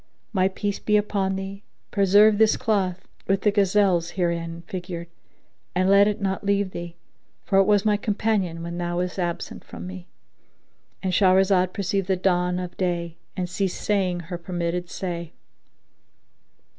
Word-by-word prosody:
My 190 Hz, -2 st, +3 dB
peace 200 Hz, +1 st, -3 dB
be 210 Hz, 0 st, +2 dB
upon 200 Hz, -2 st, 0 dB
thee; 195 Hz, +1 st, -6 dB, 0.3 s
preserve 205 Hz, +2 st, +5 dB
this 220 Hz, -1 st, +5 dB
cloth 195 Hz, -6 st, -1 dB, 0.2 s
with 195 Hz, 0 st, +2 dB
the 210 Hz, -, +3 dB
gazelles 195 Hz, -4 st, +3 dB
herein 170 Hz, -1 st, -1 dB
figured 180 Hz, -3 st, -5 dB, 0.7 s
and 185 Hz, +1 st, +3 dB
let 200 Hz, +1 st, +7 dB
it 210 Hz, +1 st, -1 dB
not 195 Hz, -1 st, -2 dB
leave 200 Hz, -1 st, +1 dB
thee, 170 Hz, -1 st, -7 dB, 0.5 s
for 195 Hz, -1 st, +3 dB
it 195 Hz, -, +5 dB
was 205 Hz, 0 st, +3 dB
my 210 Hz, -1 st, +3 dB
companion 200 Hz, -5 st, -1 dB
when 170 Hz, +1 st, -5 dB
thou 175 Hz, 0 st, -2 dB
was 180 Hz, +1 st, -2 dB
absent 175 Hz, -1 st, -3 dB
from -, -, -9 dB
me;"—And 185 Hz, 0 st, -10 dB
Shahrazad 190 Hz, -1 st, +4 dB
perceived 195 Hz, -2 st, -1 dB
the 190 Hz, -, +2 dB
dawn 180 Hz, -1 st, +1 dB
of 180 Hz, -1 st, -5 dB
day 170 Hz, -2 st, -2 dB, 0.2 s
and 180 Hz, -1 st, -1 dB
ceased 185 Hz, +1 st, -2 dB
saying 185 Hz, -4 st, 0 dB
her 175 Hz, +1 st, -6 dB
permitted 175 Hz, 0 st, -3 dB
say. 170 Hz, -4 st, -5 dB
185 Hz, 150 wpm, -24 LUFS, 175-200 Hz, 0.7 s, let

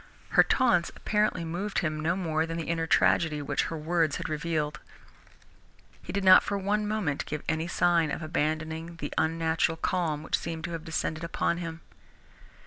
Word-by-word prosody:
Her -, -, +6 dB
taunts 185 Hz, -10 st, +2 dB
apparently 210 Hz, -5 st, 0 dB
moved 185 Hz, +5 st, -3 dB
him 155 Hz, -3 st, 0 dB
no 165 Hz, +3 st, 0 dB
more 160 Hz, -3 st, -1 dB
than 165 Hz, 0 st, -4 dB
the 165 Hz, -, -2 dB
inner 165 Hz, -1 st, -1 dB
tragedy 160 Hz, -2 st, +3 dB
which 145 Hz, -, -1 dB
her 165 Hz, -, -4 dB
words 160 Hz, -1 st, +1 dB
had -, -, -4 dB
revealed. 155 Hz, -1 st, -2 dB, 1.2 s
He -, -, -7 dB
did 200 Hz, 0 st, -2 dB
not 185 Hz, 0 st, +9 dB
for 200 Hz, -, -2 dB
one 205 Hz, +2 st, 0 dB
moment 205 Hz, -10 st, -1 dB
give 150 Hz, -1 st, -4 dB
any 160 Hz, +1 st, -1 dB
sign 170 Hz, -2 st, +2 dB
of 155 Hz, -, -4 dB
abandoning 160 Hz, +1 st, -2 dB
the 165 Hz, -, -6 dB
unnatural 165 Hz, 0 st, +1 dB
calm 160 Hz, -4 st, -1 dB
which -, -, 0 dB
seemed 165 Hz, -1 st, -5 dB
to 170 Hz, -, -4 dB
have 165 Hz, -1 st, -5 dB
descended 160 Hz, 0 st, -2 dB
upon 165 Hz, 0 st, 0 dB
him. 165 Hz, -1 st, -6 dB
165 Hz, 175 wpm, -28 LUFS, 155-175 Hz, 1.2 s, not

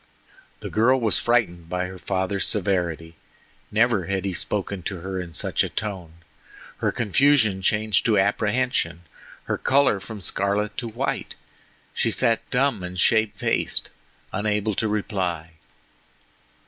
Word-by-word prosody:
The -, -, -6 dB
girl 125 Hz, +5 st, +4 dB
was 110 Hz, -6 st, +1 dB
frightened 90 Hz, -9 st, +1 dB
by 90 Hz, 0 st, -1 dB
her 95 Hz, 0 st, -8 dB
father's 95 Hz, +1 st, -1 dB
severity. 85 Hz, -5 st, -1 dB, 0.5 s
Never 110 Hz, -4 st, +2 dB
had 95 Hz, -1 st, -1 dB
he 95 Hz, -, -1 dB
spoken 100 Hz, +1 st, -2 dB
to 90 Hz, 0 st, -5 dB
her 95 Hz, +1 st, -4 dB
in 85 Hz, -2 st, -8 dB
such -, -, +1 dB
a -, -, -2 dB
tone. 95 Hz, -7 st, -5 dB, 0.6 s
Her -, -, 0 dB
confusion 115 Hz, -3 st, +3 dB
changed 105 Hz, +1 st, +2 dB
to 110 Hz, -3 st, +4 dB
apprehension, 105 Hz, -3 st, +1 dB, 0.4 s
her -, -, -2 dB
color 135 Hz, -6 st, +3 dB
from 105 Hz, +2 st, -8 dB
scarlet 100 Hz, +3 st, -1 dB
to 120 Hz, -, -3 dB
white. 120 Hz, +4 st, -3 dB, 0.6 s
She -, -, +1 dB
sat 115 Hz, -3 st, +2 dB
dumb 135 Hz, -4 st, +1 dB
and 90 Hz, 0 st, -5 dB
shamefaced, 110 Hz, -1 st, +1 dB, 0.4 s
unable 105 Hz, 0 st, 0 dB
to 110 Hz, -, 0 dB
reply. 95 Hz, -6 st, -2 dB
100 Hz, 135 wpm, -24 LUFS, 90-110 Hz, 0.6 s, girl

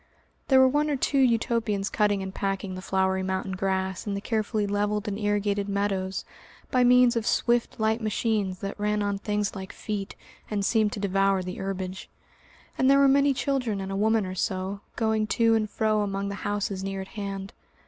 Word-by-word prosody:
There 265 Hz, -1 st, +6 dB
were 260 Hz, -, +7 dB
one 295 Hz, +3 st, +1 dB
or 290 Hz, -, +1 dB
two 275 Hz, +1 st, +1 dB
Utopians 230 Hz, -5 st, +1 dB
cutting 205 Hz, -2 st, +1 dB
and 190 Hz, 0 st, -6 dB
packing 195 Hz, -1 st, -2 dB
the 185 Hz, -, -6 dB
flowery 190 Hz, 0 st, +1 dB
mountain 190 Hz, +1 st, -2 dB
grass 190 Hz, 0 st, -2 dB
in 200 Hz, -, -1 dB
the -, -, -2 dB
carefully 215 Hz, 0 st, -1 dB
levelled 205 Hz, +1 st, -1 dB
and 205 Hz, -, -2 dB
irrigated 205 Hz, -1 st, 0 dB
meadows 195 Hz, -1 st, -1 dB, 0.5 s
by 255 Hz, -1 st, +4 dB
means 250 Hz, 0 st, +5 dB
of 230 Hz, -1 st, -1 dB
swift, 240 Hz, -1 st, +1 dB
light 220 Hz, +1 st, +1 dB
machines 210 Hz, -3 st, -1 dB
that 200 Hz, +1 st, -5 dB
ran 210 Hz, 0 st, 0 dB
on 200 Hz, -1 st, -1 dB
things 210 Hz, 0 st, -1 dB
like 190 Hz, 0 st, -6 dB
feet 205 Hz, -2 st, -5 dB, 0.3 s
and 205 Hz, -2 st, -1 dB
seemed 215 Hz, -2 st, +2 dB
to -, -, -4 dB
devour 195 Hz, -1 st, +1 dB
the 180 Hz, 0 st, -6 dB
herbage, 190 Hz, -1 st, -4 dB, 0.7 s
and 260 Hz, -, +4 dB
there 275 Hz, -, +6 dB
were 280 Hz, 0 st, +6 dB
many 280 Hz, +1 st, +4 dB
children 260 Hz, -6 st, -1 dB
and 195 Hz, 0 st, -4 dB
a -, -, -2 dB
woman 220 Hz, +1 st, +2 dB
or 185 Hz, -, -5 dB
so, 190 Hz, +2 st, -2 dB
going 220 Hz, -2 st, +1 dB
to 230 Hz, +1 st, +3 dB
and 215 Hz, -1 st, +1 dB
fro 215 Hz, 0 st, +1 dB
among 200 Hz, -1 st, -2 dB
the -, -, -4 dB
houses 205 Hz, -2 st, -2 dB
near 195 Hz, 0 st, -3 dB
at 190 Hz, -, -9 dB
hand. 195 Hz, -2 st, -5 dB
205 Hz, 195 wpm, -26 LUFS, 195-220 Hz, 0.7 s, were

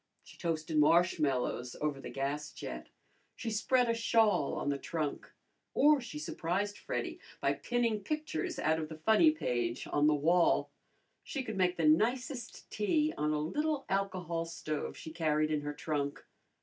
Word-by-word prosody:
She -, -, -15 dB
toasted 160 Hz, -2 st, -1 dB
marshmallows 150 Hz, -6 st, +2 dB
over 150 Hz, -2 st, -2 dB
the -, -, -7 dB
gas 140 Hz, +4 st, -3 dB
jet; 60 Hz, 0 st, -7 dB, 0.5 s
she 225 Hz, -, -4 dB
spread 245 Hz, +3 st, +2 dB
a 230 Hz, -, +2 dB
shawl 225 Hz, -8 st, +2 dB
on -, -, -2 dB
the 140 Hz, -1 st, -1 dB
trunk; 155 Hz, 0 st, -3 dB, 0.4 s
or 295 Hz, 0 st, +5 dB
she 235 Hz, -, -7 dB
surprised 180 Hz, +6 st, -2 dB
Freddy -, -, -4 dB, 0.2 s
by -, -, +2 dB
pinning 235 Hz, -3 st, 0 dB
pictures 300 Hz, -, -3 dB
out 160 Hz, +1 st, +1 dB
of 155 Hz, -1 st, -4 dB
the 160 Hz, -, -7 dB
funny 220 Hz, -, +5 dB
page 120 Hz, -, -1 dB
on 145 Hz, 0 st, +2 dB
the 150 Hz, -, +4 dB
wall. 170 Hz, +4 st, +3 dB, 0.5 s
She 275 Hz, -4 st, -4 dB
could 220 Hz, -4 st, -5 dB
make 180 Hz, -1 st, +1 dB
the 165 Hz, -, +1 dB
nicest 240 Hz, -, +1 dB
tea 305 Hz, +9 st, +1 dB
on 150 Hz, 0 st, 0 dB
a 155 Hz, -, +1 dB
little 290 Hz, -, -1 dB
alcohol 185 Hz, -4 st, -1 dB
stove 155 Hz, -2 st, -4 dB
she 160 Hz, -, -8 dB
carried 155 Hz, -2 st, +1 dB
in 150 Hz, -1 st, 0 dB
her 145 Hz, 0 st, -4 dB
trunk. 145 Hz, -2 st, -3 dB
165 Hz, 160 wpm, -32 LUFS, 150-220 Hz, 0.5 s, or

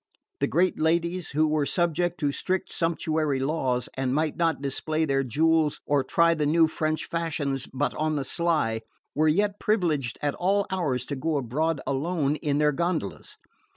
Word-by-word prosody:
The -, -, +1 dB
great 180 Hz, +2 st, +1 dB
ladies, 170 Hz, +2 st, 0 dB
who 155 Hz, +2 st, +2 dB
were 150 Hz, -2 st, +1 dB
subject 175 Hz, -1 st, 0 dB
to 145 Hz, -1 st, +2 dB
strict 185 Hz, +5 st, -2 dB
sumptuary 155 Hz, -4 st, 0 dB
laws, 130 Hz, -3 st, -1 dB
and 135 Hz, 0 st, -1 dB
might 155 Hz, 0 st, 0 dB
not 165 Hz, -2 st, +1 dB
display 155 Hz, +3 st, -1 dB
their 135 Hz, -2 st, +1 dB
jewels 155 Hz, +4 st, +2 dB
or 145 Hz, -2 st, +2 dB
try 170 Hz, +5 st, +3 dB
the 150 Hz, -2 st, 0 dB
new 160 Hz, +2 st, +4 dB
French 155 Hz, 0 st, -2 dB
fashions 150 Hz, -5 st, -2 dB
but 140 Hz, +2 st, -1 dB
on 155 Hz, 0 st, -1 dB
the 140 Hz, -2 st, -2 dB
sly, 150 Hz, -10 st, 0 dB, 0.3 s
were 155 Hz, +1 st, +2 dB
yet 200 Hz, +6 st, +1 dB
privileged 160 Hz, -, 0 dB
at 145 Hz, -1 st, +1 dB
all 200 Hz, +2 st, +1 dB
hours 150 Hz, -9 st, -1 dB
to 140 Hz, -, -4 dB
go 155 Hz, +3 st, -1 dB
abroad 145 Hz, +4 st, -1 dB
alone 145 Hz, +1 st, 0 dB
in 145 Hz, -2 st, -1 dB
their 150 Hz, 0 st, +3 dB
gondolas. 170 Hz, -, -3 dB
155 Hz, 170 wpm, -26 LUFS, 140-170 Hz, 0.3 s, new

